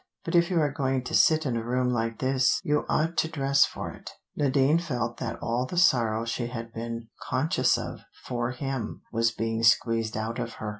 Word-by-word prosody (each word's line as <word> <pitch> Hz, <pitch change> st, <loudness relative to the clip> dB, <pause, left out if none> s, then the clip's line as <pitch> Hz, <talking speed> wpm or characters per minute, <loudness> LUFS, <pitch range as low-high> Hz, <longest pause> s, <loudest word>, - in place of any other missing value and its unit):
"But 165 Hz, -, -3 dB
if 170 Hz, 0 st, +4 dB
you 180 Hz, -3 st, +2 dB
are 150 Hz, -2 st, +2 dB
going 135 Hz, -3 st, -1 dB
to -, -, -7 dB
sit 155 Hz, -1 st, +4 dB
in 125 Hz, -4 st, -1 dB
a 115 Hz, -, -2 dB
room 125 Hz, +1 st, 0 dB
like 115 Hz, -1 st, -1 dB
this, 130 Hz, -1 st, +2 dB
you 150 Hz, 0 st, +1 dB
ought 165 Hz, +2 st, 0 dB
to -, -, +2 dB
dress 140 Hz, -3 st, +3 dB
for -, -, -6 dB
it." -, -, -10 dB, 0.3 s
Nadine 140 Hz, +2 st, +3 dB
felt 120 Hz, -8 st, -3 dB
that -, -, -4 dB
all 120 Hz, +2 st, -1 dB
the 180 Hz, -, -6 dB
sorrow 115 Hz, -10 st, +3 dB
she 120 Hz, +1 st, -2 dB
had 115 Hz, -1 st, -7 dB
been 115 Hz, 0 st, -6 dB, 0.2 s
conscious 130 Hz, +1 st, +2 dB
of 120 Hz, -, -6 dB, 0.3 s
for 120 Hz, -1 st, -2 dB
him 130 Hz, -3 st, -4 dB
was 115 Hz, 0 st, +3 dB
being 115 Hz, 0 st, -2 dB
squeezed 115 Hz, -1 st, +2 dB
out 110 Hz, +2 st, -3 dB
of 115 Hz, -, -4 dB
her. 105 Hz, -, -5 dB
125 Hz, 205 wpm, -27 LUFS, 115-140 Hz, 0.3 s, if